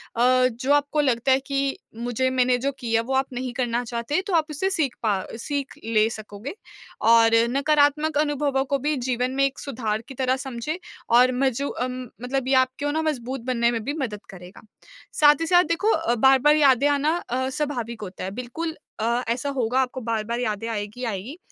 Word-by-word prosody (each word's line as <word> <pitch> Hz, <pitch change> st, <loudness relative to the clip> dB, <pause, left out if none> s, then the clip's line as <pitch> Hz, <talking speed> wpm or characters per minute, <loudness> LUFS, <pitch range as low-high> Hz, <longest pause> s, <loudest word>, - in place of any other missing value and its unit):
अ, 255 Hz, +2 st, +4 dB
जो 255 Hz, +4 st, 0 dB
आपको 290 Hz, +1 st, +2 dB
लगता 260 Hz, -2 st, +1 dB
है 260 Hz, -, +5 dB
कि 275 Hz, -1 st, -1 dB, 0.2 s
मुझे 245 Hz, +2 st, -1 dB
मैंने 255 Hz, -1 st, +2 dB
जो 275 Hz, +3 st, -1 dB
किया 230 Hz, -3 st, +1 dB
वो 250 Hz, +4 st, -4 dB
आप 265 Hz, +1 st, +1 dB
नहीं 250 Hz, 0 st, -4 dB
करना 245 Hz, -1 st, -1 dB
चाहते 235 Hz, +9 st, -2 dB
तो 390 Hz, -, -2 dB
आप 320 Hz, -2 st, +3 dB
उससे 340 Hz, +6 st, -1 dB
सीख 310 Hz, -9 st, -1 dB
पा 200 Hz, -4 st, 0 dB
सीख 280 Hz, +2 st, -3 dB
ले 220 Hz, -1 st, +3 dB
सकोगे 215 Hz, -, -8 dB, 0.5 s
और 230 Hz, 0 st, +5 dB
नकारात्मक 290 Hz, +2 st, +2 dB
अनुभवों 290 Hz, -2 st, +1 dB
को 280 Hz, +1 st, 0 dB
भी 295 Hz, +3 st, 0 dB
जीवन 250 Hz, +1 st, 0 dB
में 275 Hz, -, +2 dB
एक 275 Hz, -, -3 dB
सुधार 225 Hz, -5 st, -3 dB
की 270 Hz, -, -9 dB
तरह 260 Hz, 0 st, +1 dB
समझे, 265 Hz, +5 st, -5 dB, 0.3 s
और 250 Hz, +2 st, +6 dB
मजू 270 Hz, +1 st, 0 dB
अम, 255 Hz, 0 st, -4 dB, 0.2 s
मतलब 260 Hz, +1 st, -2 dB
ये 270 Hz, -, +2 dB
आपको 280 Hz, +3 st, -4 dB
ना 315 Hz, +2 st, 0 dB
मजबूत 265 Hz, -4 st, -3 dB
बनने 235 Hz, -2 st, +1 dB
में 225 Hz, -2 st, -3 dB
भी 285 Hz, -, -2 dB
मदद 215 Hz, -6 st, -3 dB
करेगा। 180 Hz, -1 st, -12 dB, 0.6 s
साथ 295 Hz, 0 st, +8 dB
ही 330 Hz, -, +1 dB
साथ 355 Hz, 0 st, +5 dB
देखो 350 Hz, +7 st, +1 dB
अ, 320 Hz, -, +1 dB
बार-बार 265 Hz, +4 st, +5 dB
यादें 280 Hz, -2 st, +4 dB
आना 290 Hz, +3 st, +2 dB
अ, 260 Hz, +2 st, -1 dB
स्वाभाविक 245 Hz, -6 st, -3 dB
होता 190 Hz, -3 st, -7 dB
है, 190 Hz, -, -4 dB
बिल्कुल 250 Hz, +8 st, -5 dB, 0.2 s
अ, 235 Hz, +3 st, 0 dB
ऐसा 250 Hz, +4 st, -1 dB
होगा 255 Hz, -2 st, 0 dB
आपको 260 Hz, 0 st, -3 dB
बार-बार 230 Hz, 0 st, -2 dB
यादें 220 Hz, -2 st, -2 dB
आएगी, 210 Hz, +3 st, -5 dB
आएगी। 225 Hz, -, -5 dB
255 Hz, 190 wpm, -24 LUFS, 235-285 Hz, 0.6 s, साथ